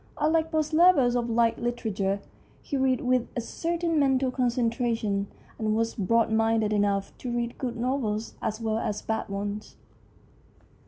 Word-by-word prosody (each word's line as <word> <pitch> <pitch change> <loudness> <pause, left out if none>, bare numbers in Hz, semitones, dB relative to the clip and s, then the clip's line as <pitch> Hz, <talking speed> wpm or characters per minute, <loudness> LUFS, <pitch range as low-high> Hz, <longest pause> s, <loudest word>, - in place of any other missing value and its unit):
Un 305 +2 +2
like 325 0 +1
most 310 -1 0
lovers 310 -8 +5
of 240 -1 0
light 230 0 +2
literature, 205 -5 -1 0.4
he 285 - -4
read 260 -2 +2
with 250 -1 +1
a - - 0
certain 335 +5 -1
mental 265 -2 +2
concentration, 235 -5 0 0.3
and 215 -1 +1
was 225 +1 0
broad 230 +3 +2
minded 225 -1 +2
enough 200 -1 0
to 250 - -5
read 235 0 -2
good 245 -3 -3
novels 230 -3 -1
as 215 0 -2
well 220 -1 -1
as 210 -2 -3
bad 220 -2 -2
ones. 205 +1 -4
235 Hz, 155 wpm, -27 LUFS, 215-260 Hz, 0.4 s, lovers